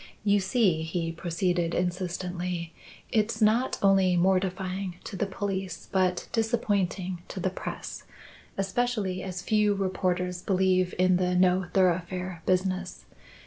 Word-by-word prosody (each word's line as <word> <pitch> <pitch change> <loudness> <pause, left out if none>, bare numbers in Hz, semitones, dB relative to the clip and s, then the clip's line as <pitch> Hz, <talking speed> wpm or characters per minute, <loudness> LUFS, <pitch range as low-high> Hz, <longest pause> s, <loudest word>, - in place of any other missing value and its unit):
"You 205 -1 +4
see," 190 -4 +2
he 165 +1 -2
proceeded 170 0 -1
insistently, 180 -1 -2 0.4
"it's 220 0 +1
not 225 +4 +3
only 190 -2 +4
mortifying 185 0 0
to - - -7
the 200 +2 -1
police 190 -2 -4
but 185 -2 +1
disappointing 200 -6 0
to - - -6
the 185 +1 0
press, - - -6 0.5
especially 195 -2 -1
as 185 -1 -5
few 210 -1 +2
reporters 180 -2 -1
believe 185 -1 +2
in 185 0 +4
the 180 0 +1
No 180 0 +3
thoroughfare 180 -1 0
business. 185 0 0
185 Hz, 120 wpm, -28 LUFS, 180-195 Hz, 0.5 s, You